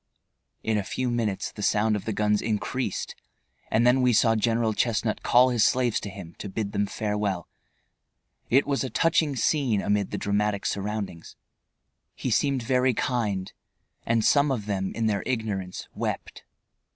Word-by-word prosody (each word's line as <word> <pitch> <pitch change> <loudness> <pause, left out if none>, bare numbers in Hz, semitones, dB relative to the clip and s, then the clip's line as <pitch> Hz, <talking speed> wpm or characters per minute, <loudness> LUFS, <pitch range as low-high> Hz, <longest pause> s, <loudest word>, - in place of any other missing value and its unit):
In 110 -1 +1
a - - -2
few 125 +5 -2
minutes 110 -5 -1
the 105 - -9
sound 105 +1 +2
of 105 - -4
the 110 - -1
guns 105 0 +1
increased, 110 +1 -2 0.6
and 115 +2 +2
then 125 +2 +5
we 125 -1 +4
saw 115 0 +4
General 115 0 +1
Chestnut 110 0 0
call 125 +1 +5
his 120 -3 +2
slaves 125 -3 +2
to 100 - -6
him 95 -4 -9
to 100 - -5
bid 100 +1 -3
them 100 0 0
farewell. 105 -5 -2 1.0
It 135 +4 +4
was 140 -1 0
a 130 - -3
touching 155 +2 +2
scene, 125 -3 +1
amid 100 0 0
the - - -3
dramatic 100 0 0
surroundings. 100 -4 -4 0.8
He 130 - -3
seemed 135 +2 +1
very 125 +1 +2
kind, 105 -8 -1 0.5
and 115 -1 +1
some 145 0 +4
of 115 -6 -2
them 95 -2 -2
in 115 - -1
their 105 -3 +1
ignorance 105 -7 -3
wept. - - -4
110 Hz, 165 wpm, -26 LUFS, 100-125 Hz, 1.0 s, then